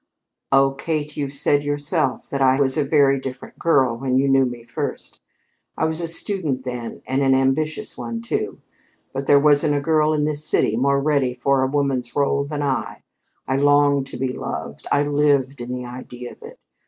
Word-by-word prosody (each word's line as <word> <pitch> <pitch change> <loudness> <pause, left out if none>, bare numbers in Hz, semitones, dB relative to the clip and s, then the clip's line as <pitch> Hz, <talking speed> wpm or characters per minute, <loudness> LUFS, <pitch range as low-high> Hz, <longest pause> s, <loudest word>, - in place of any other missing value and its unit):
"Oh, 135 0 +5
Kate, 150 +2 -3
you've 140 -2 -3
said 145 +1 +2
yourself 145 -1 -1
that 140 - -2
I 130 0 +4
was 135 -2 +2
a 150 - +2
very 140 -1 +3
different 130 -1 -8
girl 135 -8 +3
when 130 +1 -1
you 135 +1 +2
knew 135 -1 +4
me 120 -1 -7
first. - - -6 0.6
I - - +1
was 160 +1 -1
a 170 - -2
student 165 -6 0
then, 125 -2 -6
and 135 +1 -1
an 135 -1 +4
ambitious 135 +4 -1
one, 115 -1 -4
too; 115 - -3 0.5
but 135 +1 -4
there 145 - +6
wasn't 145 0 +3
a - - +1
girl 155 +1 +2
in 150 - 0
this 150 0 -2
city 130 -7 +2
more 140 +3 +2
ready 140 -3 +1
for 135 +2 +1
a 130 - +2
woman's 135 -3 -1
rôle 140 0 0
than 145 -1 -3
I. 135 -2 -2 0.4
I 130 - 0
longed 145 -1 +3
to - - -8
be 130 0 -2
loved - - -6
I 145 - +3
lived 145 -2 +1
in 120 +1 -6
the 125 0 -4
idea 125 0 -8
of - - -16
it. 465 +2 -11
140 Hz, 195 wpm, -21 LUFS, 130-145 Hz, 0.6 s, there